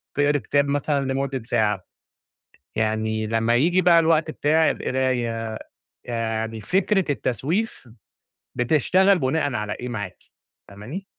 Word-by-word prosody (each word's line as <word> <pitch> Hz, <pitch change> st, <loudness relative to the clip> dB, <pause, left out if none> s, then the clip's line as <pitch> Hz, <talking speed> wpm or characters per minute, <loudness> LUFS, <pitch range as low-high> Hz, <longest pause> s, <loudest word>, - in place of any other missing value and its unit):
تقرِي 145 Hz, +1 st, +2 dB
كتاب 140 Hz, +5 st, +1 dB
مثلًا 140 Hz, 0 st, 0 dB
لمدّة 135 Hz, -2 st, -2 dB
ساعة، 105 Hz, -5 st, 0 dB, 0.9 s
يعني 110 Hz, 0 st, -1 dB
لمّا 115 Hz, +1 st, +1 dB
ييجي 175 Hz, +9 st, +3 dB
بقى 170 Hz, -1 st, +6 dB
الوقت 160 Hz, -1 st, +2 dB
بتاع 155 Hz, +1 st, +2 dB
القراية، 120 Hz, -4 st, -1 dB, 0.5 s
يعني 115 Hz, -1 st, -3 dB
فكرة 190 Hz, -, +1 dB
التسويف 145 Hz, -, -2 dB, 0.7 s
بتشتغل 180 Hz, +9 st, +3 dB
بُناءً 140 Hz, +1 st, 0 dB
على 105 Hz, -2 st, -2 dB
إيه 125 Hz, +3 st, -6 dB
معاكِ؟ 105 Hz, -6 st, -5 dB, 0.5 s
فاهماني؟ 110 Hz, -, -8 dB
130 Hz, 115 wpm, -23 LUFS, 110-155 Hz, 0.9 s, بقى